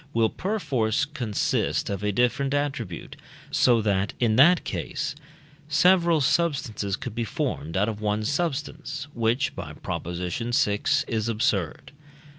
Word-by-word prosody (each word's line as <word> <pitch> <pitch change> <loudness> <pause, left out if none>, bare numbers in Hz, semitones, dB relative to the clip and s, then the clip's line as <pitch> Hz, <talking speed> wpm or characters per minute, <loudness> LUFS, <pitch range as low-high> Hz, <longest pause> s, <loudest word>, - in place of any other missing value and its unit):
will 115 -1 +3
perforce 145 - 0
consist 125 -9 -1
of 100 -1 -3
a 105 - +1
different 125 +6 +1
attribute, 130 - -3 0.4
so 120 -3 +4
that, 100 -1 0
in 115 -3 +2
that 170 +8 +6
case, 150 -1 -3 0.6
several 170 +1 +4
substances 130 - 0
could 120 +1 -6
be 115 +1 -2
formed 80 -6 -3
out 100 +2 +2
of 110 -2 -4
one 105 0 0
substance, 145 0 -2
which 120 +3 0
(by 80 -5 -6
Prop. - - -5
vi.) 90 +7 -3 0.6
is 110 0 -1
absurd. 105 - -1
115 Hz, 130 wpm, -25 LUFS, 105-145 Hz, 0.6 s, that